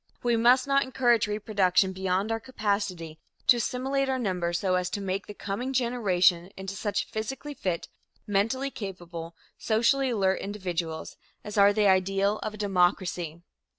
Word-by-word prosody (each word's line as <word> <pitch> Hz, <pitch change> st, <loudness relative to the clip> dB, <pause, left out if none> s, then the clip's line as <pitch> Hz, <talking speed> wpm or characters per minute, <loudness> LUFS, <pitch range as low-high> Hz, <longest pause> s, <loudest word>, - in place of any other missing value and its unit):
We 240 Hz, -1 st, +2 dB
must 245 Hz, +3 st, +5 dB
not 275 Hz, 0 st, +3 dB
encourage 245 Hz, -4 st, +2 dB
reproduction 195 Hz, -3 st, +1 dB
beyond 190 Hz, +3 st, -1 dB
our 225 Hz, -, 0 dB
capacity 200 Hz, -9 st, -3 dB, 0.3 s
to 245 Hz, -, +6 dB
assimilate 265 Hz, +3 st, -1 dB
our 260 Hz, -, +1 dB
numbers 180 Hz, -7 st, -1 dB
so 185 Hz, 0 st, 0 dB
as 180 Hz, -1 st, +1 dB
to -, -, -3 dB
make 195 Hz, 0 st, -3 dB
the 210 Hz, -, -8 dB
coming 230 Hz, +8 st, -4 dB
generation 195 Hz, -8 st, +2 dB
into 190 Hz, 0 st, -5 dB
such 205 Hz, 0 st, -1 dB
physically 245 Hz, +6 st, -5 dB
fit, 180 Hz, -10 st, -3 dB, 0.4 s
mentally 225 Hz, +7 st, 0 dB
capable, 175 Hz, -6 st, -7 dB, 0.2 s
socially 240 Hz, +5 st, +2 dB
alert 195 Hz, -5 st, +1 dB
individuals 175 Hz, -5 st, -4 dB, 0.3 s
as 210 Hz, -1 st, -7 dB
are 200 Hz, -1 st, +6 dB
the 210 Hz, 0 st, +1 dB
ideal 195 Hz, +2 st, +2 dB
of 215 Hz, 0 st, -5 dB
a -, -, -11 dB
democracy. 180 Hz, -4 st, 0 dB
200 Hz, 150 wpm, -27 LUFS, 185-235 Hz, 0.4 s, to